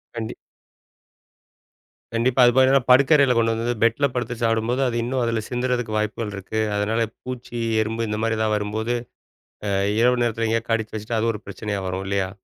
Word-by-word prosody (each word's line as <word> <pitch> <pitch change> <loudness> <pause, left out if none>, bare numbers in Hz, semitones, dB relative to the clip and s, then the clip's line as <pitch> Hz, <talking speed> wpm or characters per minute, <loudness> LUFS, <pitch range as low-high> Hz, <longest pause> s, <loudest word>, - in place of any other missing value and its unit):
கண்டிப் 110 -1 -5 1.8
கண்டிப்பா. 120 +3 +2
அது 120 - +6
போக 130 - +6
என்னனா 135 -1 +4
படுக்கரையில 140 0 +5
கொண்டு 115 0 +3
வந்து 115 +2 -1
பெட்ல 115 +5 +3
படுத்துச் 125 -1 -3
சாப்பிடும்போது 115 +3 +1
அது 120 - -2
இன்னும் 130 +1 -1
அதுல 115 -2 -1
சிந்துறதுக்கு 125 -2 -1
வாய்ப்புகள் 105 0 -2
இருக்கு. 105 +3 -3 0.2
அதனால 110 +3 0 0.2
பூச்சி, 125 -1 -6 0.2
எறும்பு 115 +1 -2
இந்த 105 - -2
மாதிரி 115 -1 0
எதாவது 110 -1 +1
வரும்போது, 110 +3 -2 0.7
ஆ, - - 0 0.3
இரவு 125 +1 +3
நேரத்தில 115 -1 0
எங்கேயோ 115 +1 0
கடிச்சு 110 -1 -1
வச்சிட்டா, 110 +2 -3
அது 115 +1 +1
ஒரு 105 - -7
பிரச்சனையா 100 0 -4
வரும் 95 +1 -3
இல்லையா? 95 -1 -1
115 Hz, 170 wpm, -23 LUFS, 110-125 Hz, 1.8 s, அது